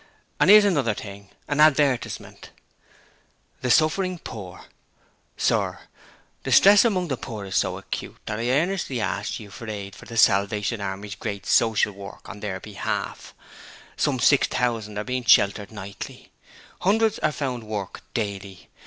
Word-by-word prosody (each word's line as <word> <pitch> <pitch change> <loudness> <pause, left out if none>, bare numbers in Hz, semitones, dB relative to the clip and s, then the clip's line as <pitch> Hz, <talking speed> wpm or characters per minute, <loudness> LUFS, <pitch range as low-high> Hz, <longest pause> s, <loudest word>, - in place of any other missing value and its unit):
And - - +4
'ere's 210 0 +9
another 140 - +1
thing, 100 -1 -9 0.2
an 145 +1 -2
advertisement: 145 -4 +2 1.1
'THE 125 - -1
SUFFERING 180 +7 +2
POOR 100 - -9 0.7
Sir: - - +1 0.7
Distress 200 +1 +7
among 185 -7 0
the 135 - -1
poor 110 -4 -7
is 95 - -6
so - - +1
acute - - -6
that 105 0 -4
I 120 +1 -1
earnestly 155 -1 0
ask 105 -1 -2
you 105 -3 -11
for 110 +2 -8
aid 100 -2 -6
for - - -13
The 115 - -8
Salvation 105 +1 +2
Army's 100 +1 -5
great 100 -1 -5
Social 110 -2 +3
work 100 0 -11
on 105 - -9
their 95 -3 -4
behalf. 100 0 -5 0.6
Some 140 -3 0
600 115 -5 +1
are 105 - -2
being 125 +1 -3
sheltered 100 -2 +4
nightly. 100 -2 -9 0.5
Hundreds 220 +3 +2
are 155 - +1
found 130 -4 -3
work 105 -3 -5
daily. 100 -4 -5
110 Hz, 145 wpm, -24 LUFS, 100-145 Hz, 1.1 s, ere's